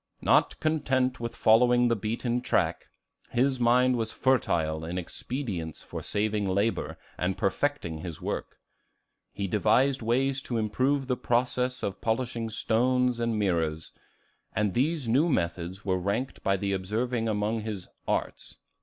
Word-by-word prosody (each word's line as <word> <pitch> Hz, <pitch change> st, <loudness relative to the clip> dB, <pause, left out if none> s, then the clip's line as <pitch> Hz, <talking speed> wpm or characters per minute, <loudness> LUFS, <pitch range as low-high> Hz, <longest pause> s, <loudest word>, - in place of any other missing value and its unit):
Not -, -, +3 dB
content 130 Hz, -5 st, +1 dB
with 115 Hz, 0 st, -4 dB
following 120 Hz, +2 st, +5 dB
the 115 Hz, -, +2 dB
beaten 115 Hz, +3 st, -2 dB
track, -, -, 0 dB, 0.4 s
his 130 Hz, +2 st, +1 dB
mind 125 Hz, +1 st, +4 dB
was 110 Hz, -1 st, -2 dB
fertile 80 Hz, -12 st, +1 dB
in 85 Hz, +3 st, -4 dB
expedients 90 Hz, -, -4 dB
for -, -, -6 dB
saving 105 Hz, -1 st, 0 dB
labor 100 Hz, +4 st, 0 dB, 0.2 s
and 90 Hz, +1 st, 0 dB
perfecting 95 Hz, -, -1 dB
his 85 Hz, -2 st, -6 dB
work. -, -, -4 dB, 0.7 s
He 100 Hz, -, -3 dB
devised 130 Hz, +7 st, +2 dB
ways 130 Hz, +4 st, +1 dB
to 120 Hz, -, -3 dB
improve 130 Hz, +6 st, +1 dB
the 125 Hz, -1 st, 0 dB
process 125 Hz, +2 st, 0 dB
of 95 Hz, -1 st, -3 dB
polishing 115 Hz, 0 st, -1 dB
stones 125 Hz, +2 st, +1 dB
and 115 Hz, -2 st, 0 dB
mirrors; 80 Hz, -6 st, 0 dB, 0.6 s
and 105 Hz, -3 st, +1 dB
these 145 Hz, +1 st, 0 dB
new 140 Hz, +9 st, +3 dB
methods 90 Hz, -, -2 dB
were 95 Hz, -2 st, +1 dB
ranked 100 Hz, +8 st, -2 dB
by 100 Hz, 0 st, +1 dB
the 100 Hz, +1 st, -1 dB
observing 115 Hz, +5 st, -1 dB
among 105 Hz, +1 st, 0 dB
his 105 Hz, -4 st, -5 dB, 0.2 s
"arts." -, -, -2 dB
115 Hz, 140 wpm, -28 LUFS, 100-125 Hz, 0.7 s, following